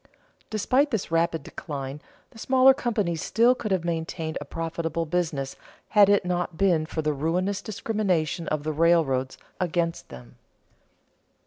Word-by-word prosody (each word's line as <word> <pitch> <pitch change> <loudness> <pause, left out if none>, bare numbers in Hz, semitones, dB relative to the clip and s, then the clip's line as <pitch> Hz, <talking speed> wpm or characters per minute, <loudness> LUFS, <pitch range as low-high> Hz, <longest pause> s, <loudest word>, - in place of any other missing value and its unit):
Despite 255 +7 +2
this 220 - -3
rapid 165 -2 +1
decline, 140 -2 -6 0.3
the 225 - -14
smaller 260 +2 +5
companies 210 - -1
still 235 +2 +4
could 235 -4 -5
have 185 -3 0
maintained 160 -1 -3
a - - -6
profitable 165 +1 -3
business 155 -5 -2 0.3
had 205 -2 +6
it 200 -2 +3
not 175 -2 -2
been 170 -5 +2
for 160 - -3
the 150 0 +1
ruinous 180 +7 -1
discrimination 190 -7 -1
of 155 -1 -1
the 155 0 -2
railroads 150 -5 +2 0.2
against 170 -2 -1
them. 60 -1 -12
170 Hz, 140 wpm, -26 LUFS, 155-200 Hz, 0.3 s, had